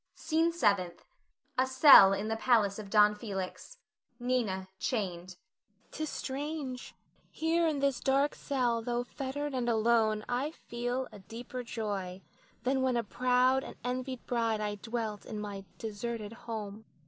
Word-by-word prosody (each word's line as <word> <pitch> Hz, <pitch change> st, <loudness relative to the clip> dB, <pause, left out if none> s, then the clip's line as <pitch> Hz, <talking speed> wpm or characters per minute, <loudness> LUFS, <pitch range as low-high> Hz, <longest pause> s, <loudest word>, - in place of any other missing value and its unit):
SCENE 325 Hz, +1 st, +1 dB
SEVENTH. 200 Hz, -, 0 dB, 0.5 s
[A 260 Hz, -, +3 dB
cell 260 Hz, -7 st, +9 dB
in 200 Hz, +2 st, -1 dB
the 225 Hz, -, -1 dB
palace 220 Hz, -4 st, +2 dB
of 205 Hz, -2 st, -8 dB
Don 210 Hz, 0 st, +6 dB
Felix. 205 Hz, -, -6 dB, 0.4 s
Nina 235 Hz, -7 st, -1 dB
chained.] 185 Hz, -6 st, -3 dB
Nina. 210 Hz, +4 st, -42 dB
'T 310 Hz, -, -4 dB
is -, -, -5 dB
strange; 275 Hz, -2 st, -5 dB, 0.3 s
here 330 Hz, +1 st, +1 dB
in 310 Hz, -2 st, 0 dB
this 275 Hz, -3 st, +1 dB
dark 275 Hz, +2 st, +2 dB
cell, 245 Hz, -5 st, 0 dB
tho' 240 Hz, +1 st, -1 dB
fettered 280 Hz, +3 st, -4 dB
and 245 Hz, -2 st, 0 dB
alone, 220 Hz, -1 st, +2 dB
I 250 Hz, +4 st, -1 dB
feel 245 Hz, -3 st, -4 dB
a -, -, -11 dB
deeper 235 Hz, +6 st, -7 dB
joy 200 Hz, -6 st, -4 dB, 0.4 s
than 265 Hz, +1 st, +1 dB
when 260 Hz, -2 st, +2 dB
a 235 Hz, -, 0 dB
proud 250 Hz, +3 st, +2 dB
and -, -, -9 dB
envied 255 Hz, +1 st, -3 dB
bride 230 Hz, -3 st, 0 dB
I 210 Hz, -1 st, -2 dB
dwelt 220 Hz, -1 st, -4 dB
in 215 Hz, -, -6 dB
my 200 Hz, -2 st, -6 dB
deserted 220 Hz, 0 st, -5 dB
home. 220 Hz, -2 st, -7 dB
235 Hz, 150 wpm, -31 LUFS, 210-260 Hz, 0.5 s, cell